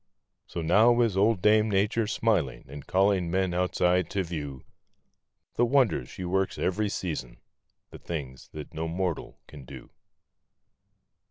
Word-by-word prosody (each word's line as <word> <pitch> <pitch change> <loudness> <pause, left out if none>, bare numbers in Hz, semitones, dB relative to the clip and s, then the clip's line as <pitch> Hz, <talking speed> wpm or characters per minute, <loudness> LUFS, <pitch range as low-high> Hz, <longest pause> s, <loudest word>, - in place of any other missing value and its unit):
So 85 - -5
now 110 +8 +4
is 115 -5 +1
old 100 0 +2
Dame 110 +1 +4
Nature 105 +3 +1
smiling 105 - 0
and 70 +1 -10
calling 95 -2 +2
men 95 0 0
outside 90 -1 +1
to 100 -1 -1
view 75 -6 -6 0.9
The 120 - +3
wonders 120 - +2
she 90 - -7
works 95 +2 -1
every 105 +3 0
season—the 75 -11 -8
things 70 -6 -7
that 75 +1 -9
no 80 +1 -3
mortal 85 0 -3
can 75 -3 -12
do. - - -12
90 Hz, 135 wpm, -27 LUFS, 80-105 Hz, 0.9 s, now